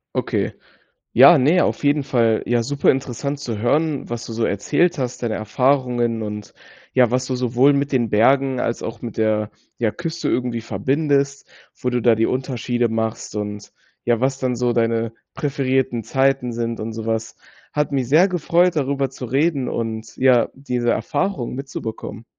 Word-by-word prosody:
Okay. -, -, -1 dB, 0.6 s
Ja, 170 Hz, -, +8 dB
ne, 155 Hz, +8 st, +4 dB
auf -, -, -2 dB
jeden 145 Hz, 0 st, +2 dB
Fall, 115 Hz, -5 st, +1 dB
ja, 120 Hz, 0 st, +1 dB
superinteressant 140 Hz, +1 st, 0 dB
zu 120 Hz, -6 st, -4 dB
hören, 145 Hz, +5 st, 0 dB
was 120 Hz, 0 st, -4 dB
du 115 Hz, -, -6 dB
so 115 Hz, 0 st, 0 dB
erzählt 165 Hz, -, +1 dB
hast, 125 Hz, -1 st, -3 dB
deine 115 Hz, -2 st, -1 dB
Erfahrungen 120 Hz, 0 st, +1 dB
und 105 Hz, -1 st, -6 dB, 0.4 s
ja, 125 Hz, -3 st, +4 dB
was 125 Hz, +1 st, 0 dB
du 130 Hz, -, -3 dB
sowohl 125 Hz, +3 st, +3 dB
mit 140 Hz, 0 st, 0 dB
den 120 Hz, -5 st, +1 dB
Bergen 130 Hz, +4 st, +3 dB
als 115 Hz, -, -2 dB
auch 115 Hz, 0 st, -6 dB
mit 120 Hz, -2 st, -7 dB
der, 110 Hz, -1 st, +1 dB, 0.3 s
ja, 115 Hz, -2 st, +2 dB
Küste 170 Hz, +3 st, -4 dB
irgendwie 125 Hz, -2 st, -1 dB
verbindest, 140 Hz, +3 st, 0 dB, 0.3 s
wo 125 Hz, -, 0 dB
du 125 Hz, 0 st, 0 dB
da 120 Hz, 0 st, +4 dB
die 115 Hz, +1 st, +1 dB
Unterschiede 125 Hz, -2 st, -1 dB
machst 110 Hz, -1 st, -3 dB
und 105 Hz, 0 st, -5 dB, 0.3 s
ja, 120 Hz, -1 st, +2 dB
was 135 Hz, +1 st, +1 dB
dann 130 Hz, -2 st, -1 dB
so 120 Hz, 0 st, +1 dB
deine 115 Hz, -1 st, 0 dB, 0.2 s
präferierten 130 Hz, -4 st, -1 dB
Zeiten 135 Hz, 0 st, +1 dB
sind 115 Hz, 0 st, -3 dB
und 110 Hz, +1 st, -4 dB
so 110 Hz, 0 st, -6 dB
was. 110 Hz, 0 st, -2 dB, 0.4 s
Hat 150 Hz, 0 st, 0 dB
mich 130 Hz, -4 st, 0 dB
sehr 160 Hz, +7 st, +5 dB
gefreut, 175 Hz, 0 st, +2 dB
darüber 140 Hz, -2 st, 0 dB
zu 130 Hz, -1 st, -8 dB
reden 135 Hz, +2 st, +1 dB
und 110 Hz, -1 st, -4 dB
ja, 125 Hz, -3 st, +4 dB
diese 125 Hz, -3 st, -1 dB
Erfahrung 145 Hz, -6 st, -2 dB
mitzubekommen. 115 Hz, -4 st, -6 dB
125 Hz, 170 wpm, -21 LUFS, 115-140 Hz, 0.6 s, Ja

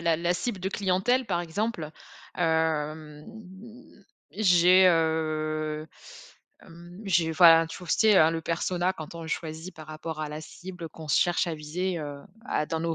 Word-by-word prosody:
la 165 Hz, -1 st, +2 dB
la 170 Hz, +2 st, 0 dB
cible 205 Hz, +1 st, -3 dB
de 190 Hz, -, -2 dB
clientèle, 200 Hz, +6 st, 0 dB
par 175 Hz, -3 st, -1 dB
exemple. 170 Hz, -2 st, -3 dB, 0.5 s
Hem, 155 Hz, -2 st, -1 dB, 1.1 s
j'ai, 185 Hz, -2 st, +5 dB
heu, 155 Hz, -2 st, 0 dB, 0.8 s
hem, 175 Hz, +3 st, -13 dB
j'ai, 170 Hz, -4 st, +1 dB
voilà, 165 Hz, -1 st, +7 dB
tu 165 Hz, -, -8 dB
vois 180 Hz, -, -11 dB
tu -, -, +3 dB
sais 215 Hz, -2 st, +5 dB
hein, 155 Hz, -, +5 dB
le 165 Hz, 0 st, -3 dB
persona, 175 Hz, +2 st, -1 dB
quand 155 Hz, -3 st, -9 dB
on 165 Hz, -, -7 dB
le 160 Hz, -, -8 dB
choisit 160 Hz, +3 st, -5 dB
par 155 Hz, -1 st, -12 dB
rapport 155 Hz, 0 st, -6 dB
à 150 Hz, -, -3 dB
la 150 Hz, +1 st, -6 dB
cible, 175 Hz, +1 st, -9 dB
qu'on 160 Hz, -1 st, -11 dB
se 130 Hz, -, +3 dB
cherche 175 Hz, +1 st, +1 dB
à 165 Hz, -, -2 dB
viser, 170 Hz, +4 st, -3 dB
heu, 145 Hz, -2 st, -6 dB, 0.3 s
à -, -, 0 dB
dans 160 Hz, -, -2 dB
nos 165 Hz, 0 st, -1 dB
165 Hz, 175 wpm, -27 LUFS, 155-180 Hz, 1.1 s, voilà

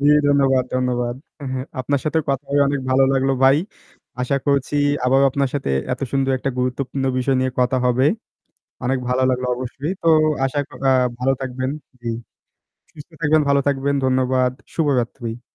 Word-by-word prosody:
জ্বি, 145 Hz, +1 st, +4 dB, 0.2 s
ধন্যবাদ, 135 Hz, -2 st, +3 dB
ধন্যবাদ। 125 Hz, -1 st, 0 dB, 0.2 s
অ্যা 145 Hz, -, -7 dB
হ্যাঁ, 130 Hz, 0 st, -4 dB
আপনার 140 Hz, +1 st, 0 dB
সাথে 155 Hz, +1 st, +1 dB
কথা 135 Hz, +1 st, -2 dB
হয়ে 145 Hz, 0 st, +4 dB
অনেক 140 Hz, -1 st, -1 dB
ভালো 135 Hz, +1 st, +5 dB
লাগলো 135 Hz, 0 st, +2 dB
ভাই। 135 Hz, +1 st, +6 dB, 0.7 s
আশা 140 Hz, +2 st, 0 dB
করছি 140 Hz, 0 st, +1 dB, 0.3 s
আবারও 135 Hz, +2 st, +4 dB
আপনার 140 Hz, 0 st, 0 dB
সাথে 140 Hz, -, -2 dB, 0.2 s
এত 125 Hz, -, -4 dB
সুন্দর 135 Hz, -1 st, +1 dB
একটা 135 Hz, +1 st, -2 dB
গুরুত্বপূর্ণ 135 Hz, +1 st, -2 dB
বিষয় 130 Hz, +1 st, +1 dB
নিয়ে 130 Hz, 0 st, 0 dB
কথা 125 Hz, +1 st, +2 dB
হবে। 125 Hz, +2 st, +3 dB, 0.8 s
অনেক 130 Hz, +1 st, +1 dB
ভালো 130 Hz, +1 st, +1 dB
লাগলো 125 Hz, 0 st, -1 dB
অবশ্যই। 130 Hz, +5 st, -4 dB
তো -, -, +1 dB, 0.4 s
আশা 135 Hz, +2 st, -1 dB, 0.3 s
আ -, -, +5 dB, 0.3 s
ভালো 135 Hz, +2 st, +2 dB
থাকবেন 130 Hz, 0 st, -3 dB, 0.3 s
জ্বি, 120 Hz, -1 st, -3 dB, 0.8 s
সুস্থ 150 Hz, +2 st, -13 dB
থাকবেন, 155 Hz, 0 st, +3 dB
ভালো 140 Hz, 0 st, +4 dB
থাকবেন। 140 Hz, 0 st, 0 dB
ধন্যবাদ। 130 Hz, -1 st, +2 dB, 0.2 s
শুভরাত্রি। 120 Hz, -5 st, -1 dB
135 Hz, 160 wpm, -21 LUFS, 125-140 Hz, 0.8 s, ভাই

